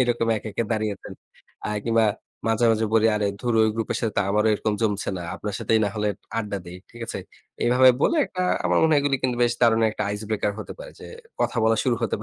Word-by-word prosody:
এরকম 120 -2 0
একা, 110 - -6
একা 115 - -1
দাঁড়িয়ে 110 -1 0
আছেন? - - -11 0.5
আ - - -3 0.2
কিংবা 115 -1 +3 0.4
মাঝে, 115 +1 +2
মাঝে 110 0 +1
বলি 110 0 +5
"আরে 105 -1 0
ধুরো 120 -2 +1
ওই - - +3
গ্রুপের 115 -1 -2
সাথে 110 -3 0
আমারও 105 +2 +2
এরকম 105 0 -1
জমছে 105 -2 0
না। 90 - -5
আপনার 105 +1 -5
সাথেই 110 - +2
নাহলে 105 +1 -1 0.3
আড্ডা 105 -3 -3
দেই।" 90 +1 -8
ঠিক 120 - -13
আছে? - - -4 0.5
এভাবে 125 +2 +6
বলে - - +3
একটা 185 -2 -4 0.2
আমার - - +3
মনে 160 0 +4
হয় 145 - +4
এগুলি 140 -1 +1
কিন্তু 125 -2 0
বেশ 120 0 +3
দারুণ 115 -2 +4
একটা 110 - -4
ice 105 +1 -6
breaker 105 -1 0
হতে - - -6
পারে। - - -9
যে - - -9 0.3
কথা 125 - 0
বলা 115 0 +3
শুরু 125 -2 +2
হতে 115 - 0
পারে। - - -7
115 Hz, 230 wpm, -24 LUFS, 105-120 Hz, 0.5 s, এভাবে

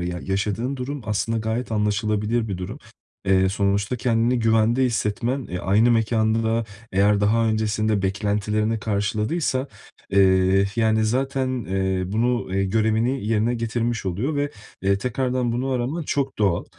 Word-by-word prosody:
Ya, 90 0 -3
yaşadığın 105 +7 -2
durum 135 +3 -4
aslında 110 +2 -1
gayet 110 +2 -3
anlaşılabilir 105 +2 0
bir 95 - -3
durum. 100 +9 -6 0.5
Eee, 95 0 +3
sonuçta 100 +3 0
kendini 120 +1 +1
güvende 115 +2 +3
hissetmen, 120 +2 -1
eee, 90 - -4
aynı 105 +7 +3
mekân 110 -1 +2
da 115 +1 +1 0.3
eğer 100 +1 +3
daha 115 +3 +2
öncesinde 110 -1 0
beklentilerini 105 +2 0
karşıladıysa, 110 +7 -1 0.4
eee, 95 0 +4
yani, 110 -1 +2
zaten, 130 +1 -1
eee, 95 0 -1
bunu 115 -1 0
eee, 95 - +1
görevini 110 +4 0
yerine 115 +2 +1
getirmiş 115 -1 -2
oluyor 110 - -1
ve, 145 0 0 0.3
eee, 100 0 +2
tekrardan 125 0 -1
bunu 125 +3 -2
araman 130 +6 -1
çok 140 -2 -2
doğal. 95 -5 +1
110 Hz, 140 wpm, -23 LUFS, 100-120 Hz, 0.5 s, eee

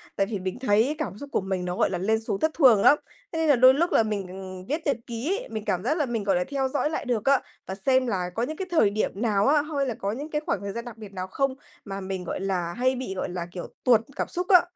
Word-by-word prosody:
Tại 195 - +2
vì 205 -1 -4
mình 185 +5 -4
thấy 245 +3 +2
cảm 305 -10 -4
xúc 285 +5 -9
của - - +1
mình 190 -1 -2
nó, 180 0 -2
gọi - - +2
là, 180 - -2
lên 220 +5 +1
xuống 200 -3 -3
thất 315 - +2
thường 250 -10 +6
lắm. 290 - +7 0.3
Thế 325 - -3
nên 320 - +2
là 285 - +7
đôi 255 +2 +7
lúc 335 +6 +1
là 225 - +5
mình 190 -3 -5
viết 305 +4 -1
nhật 285 - +2
ký 245 - -2
ấy, - - -11
mình 215 -1 -5
cảm 180 0 0
giác 295 +8 +1
là 300 - +1
mình, 235 -4 -2
gọi 195 -2 +2
là, 180 - +2
theo 270 +4 -1
dõi 290 +2 0
lại 315 - -3
được 235 -4 -1
á, 275 -1 +4 0.3
và 190 - -4
xem 255 +5 +2
là 185 -5 -1
có 230 - 0
những 305 +5 -3
cái 380 - -4
thời 315 -12 +4
điểm 210 +2 -1
nào 210 -4 +2
á, 295 +1 +5
hay 290 -2 -2
là 250 - -1
có 200 -2 -3
những 280 +8 -5
cái 300 -1 -1
khoảng 200 - -1
thời 200 0 -4
gian 235 +4 -5
đặc 235 -2 -9
biệt 210 -3 -10
nào 185 -1 -4
không, 270 +7 -1 0.3
mà 195 -1 -5
mình, 190 -1 -4
gọi 175 - -4
là, 180 -3 -1
hay 255 +4 +1
bị, 250 -6 -4
gọi 185 - -3
là, 175 -1 -4
kiểu, 180 -1 -6 0.2
tuột 235 -3 +5
cảm - - -2
xúc 360 +1 -3
á. 365 -3 +8
225 Hz, 300 wpm, -26 LUFS, 195-275 Hz, 0.3 s, á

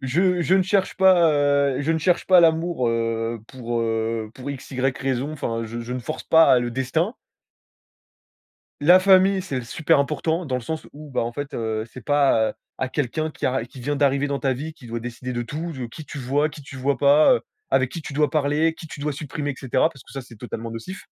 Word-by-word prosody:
je 175 +6 +2
je 185 - +3
ne 190 - +4
cherche 190 0 0
pas, 185 -4 +5
heu, 140 -2 +2
je 150 +3 -1
ne 160 - +2
cherche 175 +2 +1
pas 185 -2 +7
l'amour, 165 -5 +2
heu, 115 0 -1
pour 120 -2 -3
heu, 115 -1 -1
pour 130 +2 -6
x, 140 0 -8
y 130 - -4 0.2
raison, 135 +3 -2
enfin, 115 -6 -3
je 115 +2 -6
je 120 +2 -6
ne 125 - -3
force 155 +6 -6
pas 160 -6 +6
le 120 0 -2
destin. 160 - -1 1.7
La 175 +5 +7
famille, 190 0 +5
c'est 135 -9 -4
super 145 +4 +2
important 160 +4 -1
dans 130 -2 -1
le - - -3
sens 160 +7 -5
où, 150 +1 -11
bah, - - -1
en 120 0 -3
fait, 145 +2 -6
heu, 110 -1 -2
c'est 130 - -9
pas, 140 -6 +3
heu, - - -9 0.2
à 130 - -2
quelqu'un 150 +4 -2
qui - - -3
a 130 -2 0
qui 120 +2 -14
vient 145 +4 -1
d'arriver 140 0 +2
dans 140 -1 -2
ta 135 -1 +1
vie 150 +5 -5
qui 125 -7 -14
doit 115 +1 -3
décider 125 +2 -6
de 120 0 -2
tout, 155 +8 -5
de 130 -4 -5
qui 150 +7 -10
tu 145 - -8
vois, 140 +4 +1
qui 145 0 -11
tu 135 -1 -11
vois 135 +1 0
pas, 145 +2 +6
heu, - - -1 0.3
avec 130 -1 +3
qui 165 - -6
tu 145 - -7
dois 150 -1 +2
parler, 155 +2 +1
qui 160 - -11
tu - - -9
dois 150 +1 -2
supprimer, 145 0 -4
et 135 - -5
cetera, 130 -1 +1
parce 135 - -15
que - - -18
ça, 135 -1 -5
c'est 120 -1 -14
totalement 115 0 -6
nocif. 150 - -8
140 Hz, 235 wpm, -23 LUFS, 125-155 Hz, 1.7 s, pas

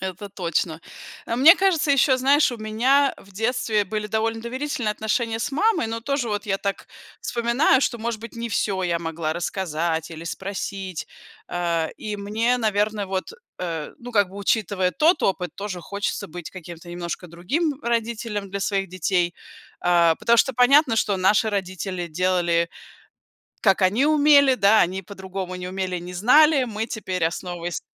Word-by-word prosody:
Это 190 +2 -5
точно. 170 -4 -2 0.5
Э, 230 - -2
мне 285 +7 +9
кажется, 365 -6 +2
ещё, 270 -1 +4
знаешь, 275 +3 +4
у - - -5
меня, 245 +6 +2
э, - - -16
в 195 - -18
детстве 220 0 0
были 210 +2 -3
довольно 225 +1 -1
доверительные 255 0 -3
отношения 225 +2 -1
с 275 - -3
мамой, 415 - +2
но 225 +1 -4
тоже 275 0 -1
вот 205 0 -2
я 195 -1 0
так 200 0 -3 0.3
вспоминаю, 240 +3 +2
что, 240 -3 0
может 230 0 -3
быть, 230 - -9
не 235 0 -4
всё 200 -3 -1
я 170 -2 0
могла 165 -1 -3
рассказать 165 -2 -2
или 165 0 -8
спросить. 190 -1 -5 0.4
Э, 170 -2 -1
и 210 -1 -5
мне, 220 +5 0
наверно, 210 -2 0
вот, 190 0 -3 0.3
э, 165 -4 -4
ну, 245 +1 -9
как 205 -4 +3
бы, 190 - -12
учитывая 200 -2 0
тот 315 - +2
опыт, 180 -2 0
тоже 195 -3 -5
хочется 200 +3 -3
быть 175 +1 -8
каким-то 175 -2 -10
немножко 175 +1 -5
другим 270 - -2
родителем 230 -3 -2
для 200 - -3
своих 195 -1 -1
детей. 180 0 0 0.5
Э, 170 -2 +4
потому 235 - +3
что 265 +3 +3
понятно, 250 0 +5
что 210 -2 +1
наши 200 +4 +3
родители 185 -3 -3
делали, 175 0 +1 0.9
как 195 -2 +3
они 210 +10 +3
умели, 290 -3 +5
да, 210 -1 +5
они 185 +2 -2
по-другому 190 -1 -6
не 180 0 -6
умели, 185 -1 -3
не 175 +1 -8
знали. 280 - +5
Мы 220 -2 -4
теперь, 185 -6 -3
основываясь 175 +1 -3
200 Hz, 165 wpm, -23 LUFS, 180-235 Hz, 0.9 s, мне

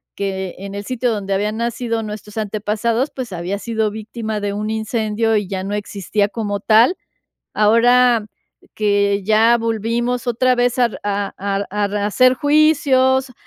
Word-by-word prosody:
que 190 -2 -3
en 195 +1 -7
el 200 0 -6
sitio 250 0 -1
donde 200 -3 -2
habían 210 +2 -1
nacido 230 -1 -2
nuestros 210 0 -8
antepasados, 220 +4 -1
pues, 255 -5 -5
había 180 +3 -3
sido 220 -1 -1
víctima 220 0 -5
de 205 0 -2
un 210 +1 -3
incendio, 220 0 -1
y 205 -2 -2
ya 190 -1 -4
no 200 +2 -4
existía 205 0 -1
como 205 -1 -3
tal. 225 - +4 0.6
Ahora 230 +1 +4 0.5
que 200 -1 +1
ya 220 +3 +4
volvimos 230 +3 -1
otra 250 +2 +2
vez 245 +1 +1
a, 250 - +5
r 235 - -8
a 200 -1 -2
a 200 +1 -2
a 205 +1 0
rehacer 210 +5 +2
juicios, 270 -3 +3
220 Hz, 155 wpm, -19 LUFS, 205-240 Hz, 0.6 s, a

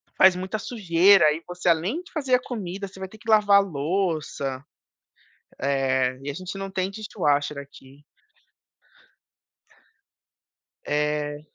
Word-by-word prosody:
faz 190 -1 +6
muita 190 +4 -4
sujeira 195 -4 +4
e 165 +2 -7
você 180 0 -5
além 185 - +1
de - - -17
fazer 270 -6 +1
a 250 - 0
comida, 200 -5 -5
você 190 0 -14
vai 190 - -5
ter 220 - -14
que 225 0 -10
lavar 205 -2 +6
louça, 155 -5 -2 1.0
eh, 130 -2 0
e 145 - -4
a - - -3
gente 185 +5 -7
não 195 0 -5
tem 190 0 -1
dishwasher 150 -9 -1
aqui. 140 0 -14 2.8
É, 150 0 -1
180 Hz, 130 wpm, -24 LUFS, 145-200 Hz, 2.8 s, faz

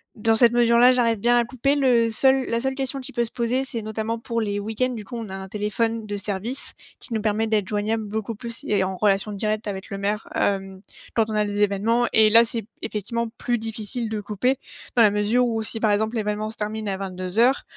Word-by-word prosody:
dans 225 +1 +2
cette 235 0 +6
mesure-là, 240 +1 +5
j'arrive 230 -3 +2
bien 240 +3 +3
à 240 - +2
couper. 260 +4 0
Le 245 -5 +3
seul 265 +3 +3
la 230 - +1
seule 265 +1 -2
question 270 0 -2
qui 255 - -4
peut 240 0 +1
se 230 - -4
poser, 250 +2 0
c'est 240 -4 -4
notamment 220 +1 -3
pour 230 0 -2
les 205 -1 -1
week-ends 220 +5 -1
du 225 -5 -6
coup. 245 - -8
On 225 -4 -5
a 190 - -6
un 190 0 -7
téléphone 215 +2 -2
de 205 -1 -4
service 205 +5 -4 0.3
qui 240 - -3
nous 220 - -1
permet 215 +1 0
d'être 210 -3 +2
joignables 215 +1 -1
beaucoup 220 +1 -4
plus 235 +1 -6
et 205 -2 +2
en 185 0 -3
relation 205 +1 +2
directe 215 +1 -1
avec 190 -1 -5
le 195 - -5
maire, 205 +2 -2
hem, 195 -1 -1 0.3
quand 225 -1 +2
on 215 - -3
a 210 - +2
des 205 0 -2
événements 220 +4 +2
et 220 -1 +7
là, 230 +2 +7
c'est 230 -2 -4 0.2
effectivement 230 +3 -3
plus 240 0 -1
difficile 225 +1 -3
de 220 - -3
couper, 215 +6 0 0.4
dans 240 - +5
la 210 - +5
mesure 210 +4 +2
ou 225 -1 -1
si, 225 +1 -2
par 215 -2 +2
exemple, 220 +3 0
l'événement 215 0 -2
se 220 - -9
termine 215 0 -4
à 190 - -2
22:00, 195 +7 +1
220 Hz, 235 wpm, -23 LUFS, 205-235 Hz, 0.4 s, et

